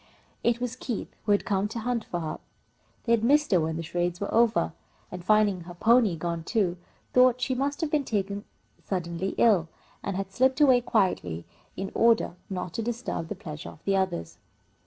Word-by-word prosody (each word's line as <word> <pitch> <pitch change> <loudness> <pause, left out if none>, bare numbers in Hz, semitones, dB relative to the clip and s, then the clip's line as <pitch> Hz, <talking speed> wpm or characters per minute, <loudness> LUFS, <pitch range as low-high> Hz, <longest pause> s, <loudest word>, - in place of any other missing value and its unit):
It 235 0 +2
was 245 0 -3
Keith, 245 -3 -5
who 210 - +2
had 205 - +3
come 200 -2 +1
to 220 - -7
hunt 235 0 -1
for 175 - -3
her. 155 - -4 0.6
They 230 - -1
had 230 -2 +3
missed 295 +5 +4
her, 185 - +5
when 160 0 -1
the 165 - -3
charades 175 +1 -2
were 200 - -3
over, 230 0 +3 0.4
and, 180 -1 -7
finding 210 -2 +3
her 175 0 -9
pony 225 -1 +4
gone 170 0 -3
too, 185 -3 0 0.4
thought 250 -1 +6
that 250 - -17
she 260 +1 0
must 280 +4 -1
have 315 -2 -1
been 300 -2 +2
taken 200 -3 -2 0.4
suddenly 180 0 -3
ill, 200 -8 +4 0.3
and 200 - -3
had 195 0 -4
slipped 260 +6 +2
away 260 -4 +6
quietly 135 - 0 0.3
in 195 0 -4
order 230 -6 +3 0.2
not 180 -3 -4
to 230 - -2
disturb 230 -7 -3
the - - -4
pleasure 150 -1 -8
of - - -15
the 195 - +2
others. 190 - -2
205 Hz, 200 wpm, -27 LUFS, 175-240 Hz, 0.6 s, thought